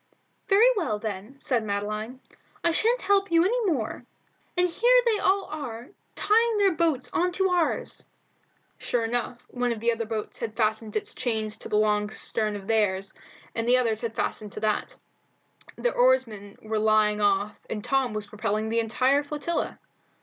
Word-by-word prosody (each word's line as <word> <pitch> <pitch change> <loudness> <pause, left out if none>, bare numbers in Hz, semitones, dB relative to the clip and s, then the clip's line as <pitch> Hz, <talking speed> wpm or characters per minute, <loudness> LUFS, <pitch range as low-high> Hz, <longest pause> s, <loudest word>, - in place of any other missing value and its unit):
"Very 435 +4 +6
well, 300 - -1
then," 215 +5 -6
said 245 -4 0
Madeline, 215 +4 -4 0.4
"I 340 - +3
sha'n't 465 +9 +2
help 395 0 +2
you 335 +1 +5
any 470 +3 +1
more; 245 -5 -3 0.5
and 360 0 +4
here 485 +8 +4
they 445 -3 +2
all 390 +1 +2
are 250 -6 -7 0.3
tying 455 +1 +3
their 400 -2 +4
boats 320 -6 0
on 360 +1 +1
to 380 +1 +2
ours." 355 -2 0 0.7
Sure 235 -2 0
enough, 240 +1 -2
one 245 -1 -1
of 230 - -3
the 235 +2 +2
other 230 -1 -3
boats 220 -1 -4
had 220 -1 -5
fastened 220 -1 0
its 215 - -2
chain 220 -4 -1
to 210 - -6
the 210 0 +2
stern 215 -1 -1
of 200 -1 -7
theirs, 195 -3 0 0.4
and 230 0 -2
the 250 +1 +5
others 225 -4 0
had 230 -2 -4
fastened 210 -2 -3
to - - -5
that; 215 -1 -1 0.8
their - - -1
oarsmen 230 - +1
were 220 0 -1
lying 215 -1 +3
off 205 +1 +1
and 210 -2 -4
Tom 270 -4 +1
was 210 -1 -3
propelling 215 +1 -2
the 230 +1 +1
entire 255 +5 +2
flotilla. 300 +3 -3
230 Hz, 170 wpm, -26 LUFS, 215-335 Hz, 0.8 s, Very